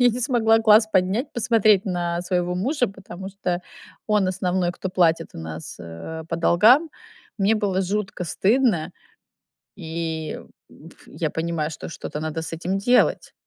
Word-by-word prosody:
я 245 - +6
не 240 +2 -4
смогла 230 -3 +3
глаз 220 0 +6
поднять, 195 +9 +1
посмотреть 220 -4 +3
на 175 -2 -1
своего 180 -1 -1
мужа, 245 - 0
потому 190 -1 -9
что 185 -3 -2 0.5
он 210 -3 +2
основной, 180 -1 0
кто 190 - -5
платит 165 -3 +2
у - - -8
нас, 80 0 -7
э, 85 - -8
по 165 - -2
долгам. 220 - +5 0.5
Мне 200 +2 +3
было 200 -3 0
жутко 190 -1 -3
стыдно, 195 - +1 0.9
и 160 -3 -4 0.3
ф - - -16
я - - -3
понимаю, 160 -2 -2
что - - -8
что-то 150 - -6
надо 160 +1 -3
с 165 - -7
этим 180 +4 -2
делать. 245 +5 +2
185 Hz, 150 wpm, -23 LUFS, 170-215 Hz, 0.9 s, я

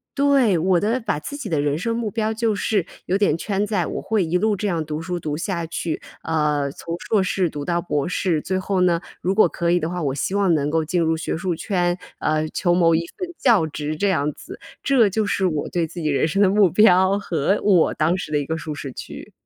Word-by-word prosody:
对， 275 -8 +3
我 175 +2 +2
的 225 +6 0
把 205 -9 -1
自 285 - -7
己 220 -9 -6
的 155 -3 0
人 145 +1 0
生 230 +6 -2
目 230 -2 -2
标 220 0 -1
就 220 -1 0
是 200 -3 0 0.2
有 190 - +1
点 195 -6 +2
圈 200 +2 -1
在 195 -6 0
我 - - -4
会 220 -4 0
一 170 +2 0
路 215 +1 +1
这 210 - -2
样 170 -5 -1
读 150 +1 -4
书 175 +1 -3
读 150 -3 -3
下 170 -2 -2
去， 165 0 -4 0.2
呃， 150 -3 0
从 165 +3 -6
硕 215 -3 +2
士 185 -2 0
读 145 -1 -6
到 170 0 0
博 145 -5 -1
士。 175 -2 0
最 185 +4 -2
后 190 0 -1
呢， 170 -2 +2 0.2
如 190 +2 0
果 215 - +6
可 170 -1 -1
以 175 - +3
的 160 - -2
话， 180 0 -4
我 140 -3 -1
希 150 - -2
望 200 -3 +3
能 145 -2 +1
够 160 0 0
进 175 +2 0
入 160 0 +1
学 160 - -3
术 180 +1 -2
圈， 175 +1 -1 0.2
呃， 155 0 0
求 175 -2 +1
谋 170 -2 +4
一 170 +1 0
份 365 - -3
教 220 -11 +3
职 150 0 -4
这 200 - +1
样 150 -6 +1
子。 - - -11 0.2
这 250 -7 +4
就 215 +3 0
是 195 -1 0
我 155 -4 -2
对 170 -2 0
自 170 +2 -8
己 155 - -2
人 145 -1 +2
生 195 +5 0
的 195 - +5
目 200 -1 +4
标， 190 0 +5
和 175 -1 0
我 185 -6 +3
当 165 +4 +1
时 155 - -6
的 150 - +2
一 145 - -3
个 160 +3 -2
舒 155 -1 -5
适 135 -3 -7
区。 - - -9
175 Hz, 270 characters per minute, -22 LUFS, 160-200 Hz, 0.2 s, 果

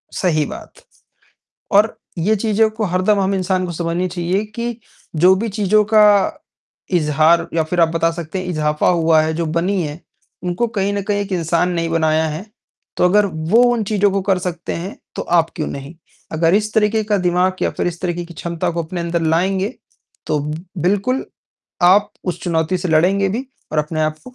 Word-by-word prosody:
सही 155 -5 +1
बात। - - -10 0.9
और 210 +2 +3 0.2
ये 205 +7 +2
चीज़ों 220 +1 +2
को 215 0 -4
हरदम 185 +3 +1
हम 195 0 +1
इंसान 185 0 0
को 175 - -5
समझनी 170 +2 -1
चाहिए 180 +3 -1
कि, 235 +2 -5 0.4
जो 180 +4 +5
भी 225 +3 -2
चीज़ 205 0 0 0.2
का 210 -2 +5 0.6
इज़हार 160 +1 +3
या 165 -1 +2
फिर 175 +3 -2
आप 165 - +6
बता 165 0 +1
सकते 170 +2 -5
हैं 185 - -5
इज़ाफा 150 -2 0
हुआ 165 -2 +4
है, 160 +1 -1
जो 165 +1 -2
बनी 175 +4 0
हैं, 150 +3 -6 0.4
उनको 180 +7 -1
कहीं 200 -3 -1
न 200 - -1
कहीं 205 0 -1
एक 200 0 -6
इंसान 170 +1 +1
ने 170 - -1
ही 165 - -2
बनाया 160 -1 +2
है। 160 +7 -6 0.5
तो - - +2
अगर 205 +3 +4
वो 175 +7 +2
उन 225 -3 -1
चीज़ों 205 -1 +1
को 195 0 0
कर 190 -1 +1
सकते 175 -1 -4
हैं, 180 +5 -6 0.2
तो - - -3
आप 170 -1 +2
क्यों 155 - -3
नहीं? 140 +4 -7 0.4
अगर 165 +2 +2
इस 215 0 0
तरीके 215 0 +2
का 210 -1 +1
दिमाग 180 +1 +1
या - - +2
फिर - - -2
इस 170 0 -5
तरीके 175 -1 -2
की 170 - -12
क्षमता 170 +2 -3
को 170 0 -2
अपने 175 +2 -5
अंदर 170 0 -1
लाएँगे, 190 +7 +1 0.5
तो 150 - +1 0.4
बिल्कुल 205 +9 0 0.6
आप 195 +4 +5
उस 180 -1 -3
चुनौती 170 +1 0
से 180 - -3
लड़ेंगे 190 +5 +3
भी 245 +7 -3 0.3
और 155 - 0
अपने 155 +1 -1
आप 155 0 -1
को 255 - -12
180 Hz, 195 wpm, -19 LUFS, 165-200 Hz, 0.9 s, आप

